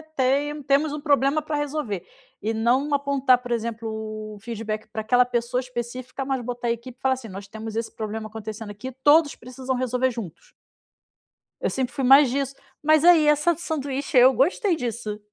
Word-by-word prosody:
tem 285 Hz, +3 st, +1 dB
temos 285 Hz, +2 st, +2 dB
um 300 Hz, -, -5 dB
problema 285 Hz, 0 st, +2 dB
para 305 Hz, 0 st, -4 dB
resolver". 285 Hz, -, -3 dB, 0.4 s
E 220 Hz, +2 st, -1 dB
não 255 Hz, +6 st, +1 dB
apontar 275 Hz, -3 st, +3 dB
por 245 Hz, -1 st, -8 dB
exemplo 230 Hz, -1 st, -2 dB
o 215 Hz, -1 st, -6 dB
feedback 215 Hz, -1 st, -5 dB
para 220 Hz, -, -3 dB
aquela 245 Hz, +3 st, +4 dB
pessoa 245 Hz, 0 st, -1 dB
específica, 250 Hz, +1 st, -5 dB
mas 265 Hz, -1 st, -1 dB
botar 240 Hz, 0 st, -4 dB
a -, -, +2 dB
equipe 235 Hz, +2 st, -6 dB
e -, -, -40 dB
falar 265 Hz, 0 st, +3 dB
assim 255 Hz, -3 st, -7 dB
nós 195 Hz, +1 st, -8 dB
temos 220 Hz, +1 st, -7 dB
esse 230 Hz, 0 st, -3 dB
problema 215 Hz, 0 st, -4 dB
acontecendo 220 Hz, 0 st, -7 dB
aqui, 210 Hz, +6 st, -7 dB
todos 295 Hz, 0 st, +5 dB
precisam 255 Hz, +2 st, -5 dB
resolver 255 Hz, +1 st, 0 dB
juntos. 220 Hz, -9 st, -8 dB, 1.1 s
Eu -, -, 0 dB
sempre 260 Hz, -1 st, -2 dB
fui 275 Hz, -, -2 dB
mais 270 Hz, 0 st, +7 dB
disso, 275 Hz, 0 st, -2 dB, 0.3 s
mas 310 Hz, +1 st, +4 dB
aí 340 Hz, -3 st, +7 dB
essa 300 Hz, +3 st, +4 dB
do 335 Hz, -, -8 dB
sanduíche 280 Hz, -5 st, -3 dB
aí 245 Hz, -, +9 dB
eu 260 Hz, +1 st, +7 dB
gostei 345 Hz, -, +2 dB
disso. 225 Hz, -5 st, -4 dB
255 Hz, 190 wpm, -24 LUFS, 225-280 Hz, 1.1 s, aí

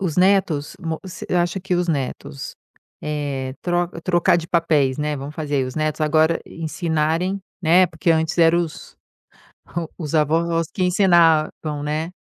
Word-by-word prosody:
os 180 Hz, -5 st, -2 dB
netos 180 Hz, -6 st, +2 dB
mo 160 Hz, -2 st, -3 dB
você 185 Hz, -2 st, -8 dB
acha 175 Hz, +2 st, +1 dB
que 185 Hz, 0 st, -1 dB
os 175 Hz, 0 st, 0 dB
netos, 130 Hz, -, -4 dB, 0.5 s
eh, 140 Hz, -3 st, -3 dB, 0.5 s
trocar 175 Hz, -2 st, +3 dB
de 170 Hz, -1 st, -4 dB
papéis, 150 Hz, -6 st, +2 dB
né, 150 Hz, 0 st, -1 dB
vamos 140 Hz, +3 st, -7 dB
fazer 145 Hz, -4 st, -1 dB
os 130 Hz, -, -7 dB
netos 155 Hz, 0 st, -1 dB
agora 155 Hz, +2 st, +3 dB
ensinarem, 165 Hz, +3 st, -1 dB, 0.2 s
né, 175 Hz, +3 st, +5 dB
porque 160 Hz, +1 st, -1 dB
antes 160 Hz, 0 st, +1 dB
eram 170 Hz, +1 st, +5 dB
os 165 Hz, -3 st, -7 dB, 1.0 s
os 155 Hz, -4 st, -5 dB
avós 165 Hz, +2 st, +1 dB
que 185 Hz, -, -1 dB
ensinavam, 165 Hz, -5 st, +3 dB
né 155 Hz, +3 st, -2 dB
160 Hz, 140 wpm, -21 LUFS, 150-175 Hz, 1.0 s, né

